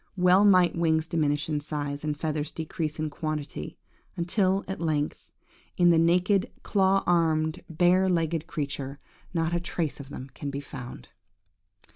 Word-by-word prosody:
Well 180 +2 +5
might 185 -3 +5
wings 160 -1 +1
diminish 150 -3 0
in 150 -2 -1
size, 145 -1 -4
and 150 -1 -2
feathers 155 -2 -2
decrease 160 -1 -4
in 155 -1 -2
quantity, 150 - -5 0.4
until 185 +2 +1
at 190 - -5
length, 155 -3 -2 0.5
in 175 -1 +6
the 165 - +4
naked, 180 +4 +3
claw 195 -1 +2
armed, 160 -2 +2
bare 180 +3 +3
legged 165 -2 0
creature, 140 -2 -4 0.3
not 165 -1 0
a 175 - +2
trace 170 -3 -3
of 140 -1 -9
them 135 -1 -8
could 145 - -5
be 140 0 -4
found! 130 -4 -9
160 Hz, 150 wpm, -27 LUFS, 150-175 Hz, 0.5 s, in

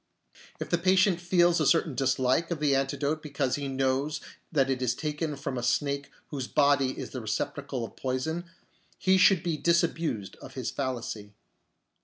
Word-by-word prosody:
If - - -5
the 175 - +3
patient 185 0 +3
feels 175 -1 +3
a - - +2
certain 165 -3 +3
dislike 130 +4 +1
of 170 -3 -2
the 145 -2 +3
antidote 140 +3 -1
because 140 -4 -2
he 140 -1 -3
knows 135 +2 0 0.3
that 140 -5 +3
it 130 -1 -1
is 125 -1 +1
taken 150 +1 -3
from 135 -2 -4
a - - -4
snake 140 +3 0 0.2
whose 135 -4 -4
body 140 -2 +2
is - - -6
the 130 - -5
receptacle 125 +4 -3
of - - -12
poison, 155 +7 -2 0.5
he 190 0 +3
should 190 -3 +5
be 170 -3 -1
disabused 165 - 0
of - - -12
his - - -3
fallacy. 120 -6 -4
140 Hz, 170 wpm, -28 LUFS, 130-165 Hz, 0.5 s, should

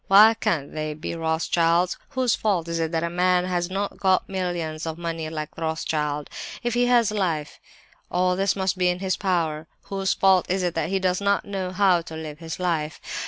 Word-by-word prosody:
Why 210 +3 +8
can't 165 -10 -1
they 155 -1 -3
be 155 - -5
Rothschilds? 165 +2 +1
Whose 260 -4 +1
fault 190 -6 0
is 165 0 -2
it 165 -1 -1
that 165 -1 0
a 170 - 0
man 180 0 +2
has 175 -1 -1
not 200 +2 -3
got 190 -1 +2
millions 175 -4 -3
of 160 0 -4
money 165 -2 -4
like 155 -1 -5
Rothschild? 155 -2 -2 0.4
If 240 -1 0
he 245 +1 +2
has 240 -3 +4
life, 165 -8 -2 0.5
all 180 0 +2
this 195 +1 +1
must 190 -1 -1
be 180 - +3
in 180 0 +1
his 190 0 -1
power! 165 -5 -1 0.2
Whose 195 -1 -1
fault 190 -2 +4
is 185 +1 0
it 175 -1 0
that 155 - -1
he 195 - +1
does 185 0 0
not 200 0 +1
know 195 -2 -3
how 185 -2 +3
to 160 -1 -9
live 155 -1 -7
his 165 0 -6
life? 160 -4 -1
180 Hz, 205 wpm, -24 LUFS, 160-190 Hz, 0.5 s, Why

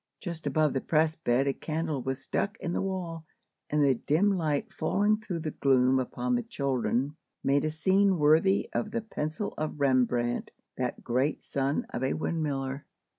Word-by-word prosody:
Just 170 -3 -5
above 155 -3 +2
the 135 - 0
press 160 0 +2
bed 130 -4 +1
a 140 - +1
candle 155 -2 -3
was 135 +1 -3
stuck 205 +9 -1
in 175 - -3
the - - 0
wall, 180 -4 -3 0.5
and 150 0 +2
the 140 -2 +5
dim 170 - +2
light 165 +5 -1
falling 205 +2 +2
through 185 -6 -5
the 155 -1 -3
gloom 130 -2 +3
upon 250 - -2
the 245 - +2
children 140 - -1 0.3
made 140 +1 +2
a - - +1
scene 190 +4 +3
worthy 160 +6 +4
of 210 - -1
the 230 +2 -2
pencil 160 -3 -4
of 155 -1 -3
Rembrandt, 125 -3 +1 0.3
that - - -3
great 130 +5 0
son 140 +1 -1
of - - -3
a 130 - +1
windmiller. 140 -4 -2
155 Hz, 175 wpm, -29 LUFS, 135-180 Hz, 0.5 s, the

